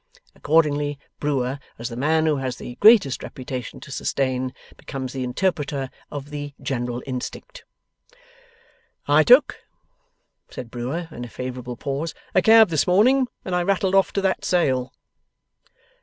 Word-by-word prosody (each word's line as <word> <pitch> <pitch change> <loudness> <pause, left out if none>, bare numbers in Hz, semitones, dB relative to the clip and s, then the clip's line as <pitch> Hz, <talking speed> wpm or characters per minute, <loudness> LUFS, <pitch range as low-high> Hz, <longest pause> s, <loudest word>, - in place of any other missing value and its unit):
Accordingly, 145 -2 +1 0.2
Brewer, 135 -2 -1 0.2
as 115 +2 -5
the 115 - -7
man 155 +5 +2
who 155 -2 +2
has 130 -2 -3
the 125 - -8
greatest 210 - +6
reputation 130 -3 -7
to - - -11
sustain, 130 -1 -1 0.2
becomes 130 -3 -6
the 130 -1 -3
interpreter 140 -1 -1 0.2
of 145 0 -7
the 145 -1 -6
general 120 -2 -3
instinct. 135 - -7 1.4
'I - - +5
took,' - - +6 0.9
says 125 - -7
Brewer 125 +9 -4
in 120 - -7
a 120 - -7
favourable 125 0 -6
pause, 140 +6 -3 0.2
'a 185 - +4
cab 220 0 +7
this 155 -3 +1
morning, 250 +9 +4 0.2
and 185 - -2
I 180 - +2
rattled 190 +1 +1
off 195 -2 +4
to 200 - 0
that 190 -1 0
Sale. 130 -8 +1
145 Hz, 140 wpm, -23 LUFS, 130-175 Hz, 1.4 s, cab